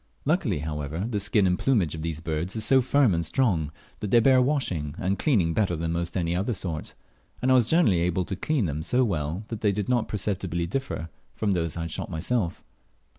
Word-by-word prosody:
Luckily, 150 - +1
however, 75 +3 -3
the 110 -4 -1
skin 105 0 +2
and 90 -1 +1
plumage 110 - +2
of 80 - -5
these 80 -1 -4
birds 80 +4 -3
is 110 - -1
so 135 -1 +5
firm 130 -3 +3
and 85 0 0
strong, 85 - +1 0.3
that 105 - -3
they 120 - +6
bear 130 +2 +5
washing 95 - -1
and 95 +1 -1
cleaning 95 - +2
better 95 -4 +1
than 80 0 -2
almost 85 +1 -2
any 85 -1 0
other 105 +6 -1
sort; 85 -5 -5 0.4
and 130 +1 +1
I - - +7
was 125 -3 +4
generally 160 - +4
able 90 +1 0
to 95 - -3
clean 130 - 0
them 75 -1 -2
so 125 +10 +2
well 85 -3 -2
that 115 -2 -5
they 105 - +3
did 100 +1 -3
not 120 -3 +2
perceptibly 95 -4 -2
differ 90 - -3 0.3
from 105 -2 0
those 85 -4 -1
I - - -2
had 85 0 -4
shot - - -4
myself. 85 +3 -2
95 Hz, 220 wpm, -26 LUFS, 85-120 Hz, 0.4 s, I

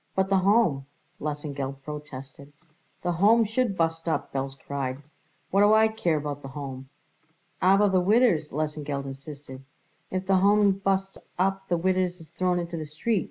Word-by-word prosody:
"But 190 0 +1
the 195 - +4
Home," 185 -9 +2 0.3
Lesengeld 140 -2 -4
protested. 140 -1 -9 0.5
"The 175 - +1
Home 210 +7 +5
should 220 -2 0
bust 165 0 0
up," - - -2
Belz 135 0 -3
cried. 140 -1 -4 0.5
"What 195 - +4
do 205 +1 +6
I 220 0 +5
care 180 -8 0
about 145 -1 -4
the 135 - -8
Home?" 135 -1 -7 0.7
"Aber 195 +3 +5
the 190 -2 +3
widders?" 195 -6 +3
Lesengeld 150 -2 -3
insisted. 135 -1 -9 0.5
"If 185 0 -3
the 190 0 +3
Home 205 +1 +5
busts 195 0 -1 0.2
up 195 +1 0
the 175 - +1
widders 185 0 0
is 160 -2 -13
thrown 180 0 0
into 170 -1 -3
the 155 - -4
street. 185 +9 0
170 Hz, 160 wpm, -26 LUFS, 145-195 Hz, 0.7 s, do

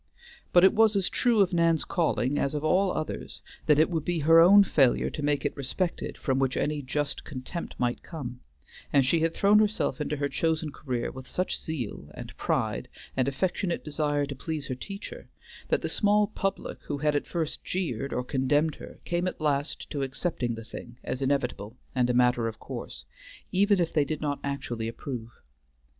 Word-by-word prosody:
But 175 - +6
it 190 - +7
was 220 -1 +4
as 195 -2 +2
true 235 -4 +3
of 190 -1 +2
Nan's 165 -2 +3
calling, 145 -6 +1
as 140 +2 0
of 150 - -2
all 185 +4 +3
others, 155 -2 -4 0.3
that 150 - +6
it 155 - +5
would 160 -3 -1
be 175 +1 -1
her 165 +3 +7
own 200 +4 +8
failure 135 -9 +3
to - - -5
make 145 -1 0
it - - -1
respected 155 +6 -2
from 130 -2 0
which 135 -1 +1
any 150 0 0
just 140 +2 -2
contempt 145 +5 -6
might 120 -1 0
come, 125 -7 -7 0.5
and 140 -2 +4
she 165 +6 +3
had 165 +1 +1
thrown 205 +1 +5
herself 210 -10 +1
into 150 0 -2
her 140 0 0
chosen 160 0 0
career 125 -4 -3
with 130 0 -10
such 185 - -1
zeal, 125 - -5
and - - -8
pride, - - -1 0.3
and 130 -1 +1
affectionate 175 +5 -1
desire 145 -1 0
to 140 - -5
please 155 +1 -4
her - - 0
teacher, 195 +10 -8 0.4
that - - +1
the - - 0
small 210 0 +3
public 195 -2 -3
who 145 - -3
had 150 +1 +1
at 145 - -1
first 165 -3 -3
jeered 140 -8 -2
or 125 - -1
condemned 145 +4 +1
her - - -10
came 175 +1 0
at - - -4
last 145 -1 -1
to 145 - -2
accepting 135 -3 -2
the 115 0 -8
thing 120 +1 -9
as 130 - -3
inevitable 125 -5 -1 0.2
and 125 -1 +2
a - - +2
matter 125 -1 +3
of 110 -1 -5
course, - - -7 0.5
even 200 +1 +3
if 170 -2 0
they 150 - +4
did 155 +2 -3
not 145 -2 -2
actually 120 -5 -3
approve. 115 0 -6
150 Hz, 195 wpm, -28 LUFS, 130-170 Hz, 0.5 s, own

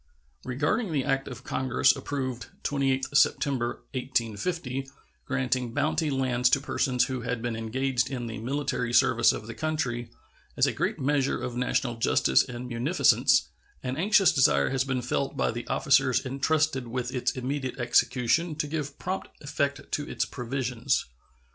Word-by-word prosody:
Regarding 155 - -1
the 140 -4 0
act 135 0 0
of 125 - -8
Congress 130 -2 +2
approved 130 -5 -4 0.2
28th 135 -1 0
September, 130 -4 +2
1850, 130 - -2 0.4
granting 125 -2 -1
bounty 155 +1 +1
lands 130 -2 +2
to 140 - +3
persons 130 -2 +1
who 130 -2 -4
had 120 0 -2
been 120 -2 -2
engaged 125 +3 -1
in 125 -3 -4
the 115 -2 -5
military 125 0 -2
service - - +5
of - - -6
the 115 - -7
country, 120 -3 -2 0.5
as - - +5
a - - 0
great - - -1
measure 140 0 +1
of 125 - -4
national 125 -1 0
justice 65 -11 +3
and 125 0 -7
munificence, 125 +9 +3 0.3
an 130 0 -2
anxious 195 +4 +4
desire 135 -3 +3
has 135 -1 +1
been 130 -2 -2
felt 135 +3 -2
by - - +1
the 120 +1 -6
officers 135 -2 +2
intrusted 135 0 0
with 125 +1 -3
its 125 - 0
immediate 130 +1 -3
execution 125 +6 +2
to 150 - -1
give 145 -2 -4
prompt 185 +1 -4
effect 145 -1 -2
to 145 - -2
its - - -1
provisions. 125 0 -2
130 Hz, 155 wpm, -27 LUFS, 120-140 Hz, 0.5 s, service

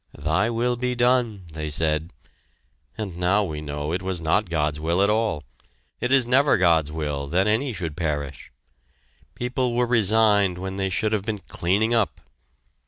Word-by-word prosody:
"Thy 80 +9 +1
will 120 +1 0
be 125 0 -1
done," 120 -4 +1
they 75 -1 -4
said, 80 +2 0 0.9
and 95 -6 -5
now 95 +4 +2
we 75 -5 -4
know 75 0 -4
it 90 - -1
was 95 -1 -3
not 85 +5 +1
God's 75 -2 -1
will 85 +5 +1
at 100 - +3
all. 105 -9 0 0.6
It 125 - -1
is 135 -2 +5
never 135 +4 +4
God's 85 -5 +3
will 75 -3 -3
that 90 +6 +1
any 115 +6 +1
should 85 -8 -4
perish! 75 -4 -4 0.8
People 125 0 -1
were 125 0 +2
resigned 105 -4 +3
when 95 +1 -5
they 95 -1 -1
should 110 +3 0
have 105 - +1
been 110 0 -3
cleaning 100 +4 0
up! 115 -3 +1
95 Hz, 170 wpm, -24 LUFS, 80-115 Hz, 0.9 s, is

